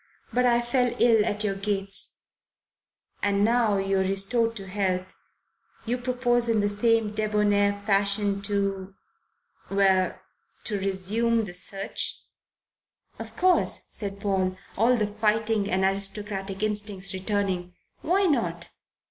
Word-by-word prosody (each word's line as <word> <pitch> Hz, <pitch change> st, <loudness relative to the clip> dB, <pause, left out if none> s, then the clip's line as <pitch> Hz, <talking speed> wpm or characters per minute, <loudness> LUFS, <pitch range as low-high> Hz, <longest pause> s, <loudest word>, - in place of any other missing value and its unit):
But 250 Hz, 0 st, +3 dB
I 240 Hz, 0 st, +3 dB
fell 245 Hz, 0 st, +1 dB
ill 230 Hz, -3 st, +5 dB
at 210 Hz, +1 st, -1 dB
your 205 Hz, -2 st, 0 dB
gates." 195 Hz, 0 st, -3 dB, 1.0 s
"And 200 Hz, 0 st, +2 dB
now 230 Hz, -2 st, +3 dB
that 195 Hz, 0 st, 0 dB
you're 195 Hz, 0 st, +1 dB
restored 195 Hz, +5 st, +1 dB
to 195 Hz, -3 st, -6 dB
health, 185 Hz, -1 st, -2 dB, 0.7 s
you 245 Hz, +2 st, -1 dB
propose 245 Hz, -1 st, 0 dB
in 225 Hz, -2 st, +3 dB
the 205 Hz, 0 st, +1 dB
same 220 Hz, +1 st, +1 dB
debonair 205 Hz, -1 st, +2 dB
fashion 200 Hz, 0 st, +1 dB
to 195 Hz, -1 st, -2 dB, 0.7 s
well 195 Hz, -2 st, +2 dB, 0.4 s
to 205 Hz, -3 st, -2 dB
resume 210 Hz, +4 st, 0 dB
the 175 Hz, -, -7 dB
search?" 195 Hz, +2 st, -3 dB, 1.0 s
"Of -, -, -8 dB
course," 365 Hz, 0 st, +2 dB
said 200 Hz, -2 st, -6 dB
Paul, 190 Hz, -2 st, 0 dB, 0.2 s
all 235 Hz, +5 st, +4 dB
the 215 Hz, -, +1 dB
fighting 215 Hz, 0 st, 0 dB
and 190 Hz, +1 st, +1 dB
aristocratic 195 Hz, 0 st, -2 dB
instincts 205 Hz, -2 st, -2 dB
returning. 190 Hz, -2 st, -2 dB, 0.3 s
"Why 370 Hz, +5 st, +2 dB
not?" 305 Hz, -6 st, 0 dB
205 Hz, 125 wpm, -26 LUFS, 195-225 Hz, 1.0 s, ill